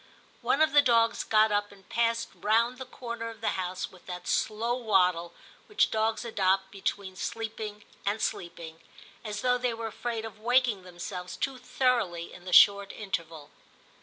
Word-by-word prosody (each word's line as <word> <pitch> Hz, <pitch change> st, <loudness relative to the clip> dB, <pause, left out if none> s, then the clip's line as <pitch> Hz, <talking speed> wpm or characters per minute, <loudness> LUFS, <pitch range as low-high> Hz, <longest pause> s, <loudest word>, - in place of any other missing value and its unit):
One 305 Hz, -, +3 dB
of 315 Hz, -, +2 dB
the 290 Hz, -, +8 dB
dogs 230 Hz, -3 st, +3 dB
got 215 Hz, 0 st, +4 dB
up 205 Hz, 0 st, 0 dB
and 195 Hz, -2 st, -18 dB
passed 230 Hz, 0 st, 0 dB
round 235 Hz, +4 st, +1 dB
the 260 Hz, -, -7 dB
corner 235 Hz, -2 st, -6 dB
of 225 Hz, -1 st, -11 dB
the 225 Hz, -, 0 dB
house 185 Hz, 0 st, -3 dB
with 185 Hz, -, -18 dB
that 180 Hz, -1 st, -7 dB
slow 225 Hz, +3 st, 0 dB
waddle 180 Hz, -7 st, +2 dB, 0.4 s
which 420 Hz, -, +2 dB
dogs 220 Hz, +1 st, 0 dB
adopt 190 Hz, -3 st, +1 dB
between 195 Hz, -1 st, -3 dB
sleeping 215 Hz, 0 st, -5 dB, 0.2 s
and 205 Hz, +2 st, 0 dB
sleeping, 170 Hz, -4 st, -4 dB, 0.4 s
as 210 Hz, -2 st, -4 dB
though 250 Hz, 0 st, +2 dB
they 245 Hz, -2 st, 0 dB
were 225 Hz, 0 st, -5 dB
afraid 225 Hz, 0 st, -4 dB
of 220 Hz, -1 st, -9 dB
waking 240 Hz, -2 st, +2 dB
themselves 180 Hz, 0 st, -7 dB
too 265 Hz, +5 st, -2 dB
thoroughly 240 Hz, -10 st, 0 dB
in 180 Hz, -, -13 dB
the 185 Hz, -, -5 dB
short 200 Hz, +1 st, +7 dB
interval. 165 Hz, -7 st, -5 dB
215 Hz, 165 wpm, -29 LUFS, 185-235 Hz, 0.4 s, the